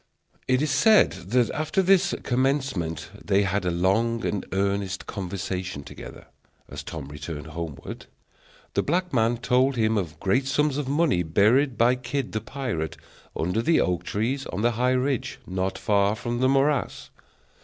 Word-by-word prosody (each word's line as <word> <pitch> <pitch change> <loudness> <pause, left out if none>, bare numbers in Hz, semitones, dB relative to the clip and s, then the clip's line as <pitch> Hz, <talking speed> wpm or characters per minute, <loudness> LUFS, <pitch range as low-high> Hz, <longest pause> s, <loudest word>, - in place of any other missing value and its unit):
It 130 +2 +2
is 155 - 0
said 215 +11 +5
that 105 +7 0
after 155 +5 0
this 190 0 +4
commencement 130 - -1
they 100 0 +2
had 95 0 -1
a - - +2
long 100 +7 +1
and 100 - -1
earnest 100 -1 -1
conversation 95 -4 -4
together, - - -10 0.4
as - - -7
Tom 75 -4 -7
returned 75 +1 -7
homeward. 80 -2 -7 0.7
The - - +2
black 180 +2 -1
man 115 -1 +2
told 130 +3 +2
him 110 -2 +2
of 85 -6 -6
great 130 +8 +1
sums 145 +1 +1
of 145 - -3
money 145 - +2
buried 110 - +3
by 120 +2 +5
Kidd 125 +1 -3
the 110 - -2
pirate 115 - -4 0.4
under 90 +7 0
the 165 +8 +3
oak 90 -2 0
trees 125 +7 -2
on 100 - -3
the 120 - +4
high 125 +3 +1
ridge, 130 0 -1
not 95 0 -2
far 100 0 +2
from 120 +2 -3
the 130 +1 +3
morass. 140 +2 +1
115 Hz, 160 wpm, -25 LUFS, 95-135 Hz, 0.7 s, said